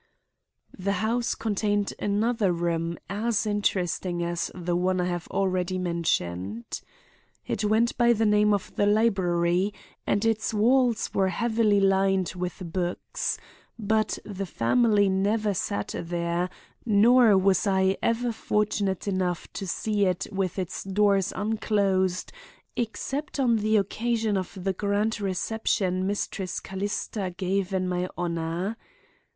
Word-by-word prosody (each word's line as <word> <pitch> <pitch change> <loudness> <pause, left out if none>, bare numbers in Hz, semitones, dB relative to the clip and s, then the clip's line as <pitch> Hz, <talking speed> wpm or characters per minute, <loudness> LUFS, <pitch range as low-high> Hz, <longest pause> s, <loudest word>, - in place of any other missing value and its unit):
"The 200 +2 -1
house 225 +4 0
contained 205 -1 0
another 210 0 +1
room 170 -1 -1
as 215 +2 0
interesting 185 -4 0
as 170 0 -2
the 175 -1 -2
one 185 +1 +1
I 180 - +1
have 175 -1 -3
already 185 -1 0
mentioned. 115 - -2 0.6
It 215 - -2
went 220 +3 +2
by 240 0 +5
the 225 0 +1
name 210 0 +4
of 200 -2 -1
the 205 - +2
library 190 -3 +2 0.3
and 205 +2 +1
its 220 -1 0
walls 240 +1 +3
were 190 - +2
heavily 220 +1 +2
lined 195 -2 +2
with 180 -1 -5
books; 180 -1 -2 0.4
but 215 -1 0
the 195 -2 -5
family 205 - +3
never 205 +2 +1
sat 105 - -2
there, 170 +1 -2 0.3
nor 225 0 +5
was 190 +1 +3
I 190 0 +3
ever 235 +1 +1
fortunate 210 -3 -1
enough 185 -3 -2
to 195 - -5
see 205 +2 0
it 180 -1 -1
with 195 -2 -2
its 185 -2 -3
doors 195 -1 +2
unclosed 200 -3 0 0.4
except 270 +6 -3
on 240 -4 +3
the 215 +1 +2
occasion 220 +1 0
of 190 +1 -3
the 195 0 0
grand 205 +3 0
reception 190 -1 0
Mistress 195 -2 -2
Callista 195 -1 -4
gave 190 0 -1
in 185 -1 0
my 180 0 -1
honor. 170 +4 -2
195 Hz, 130 wpm, -26 LUFS, 180-215 Hz, 0.6 s, by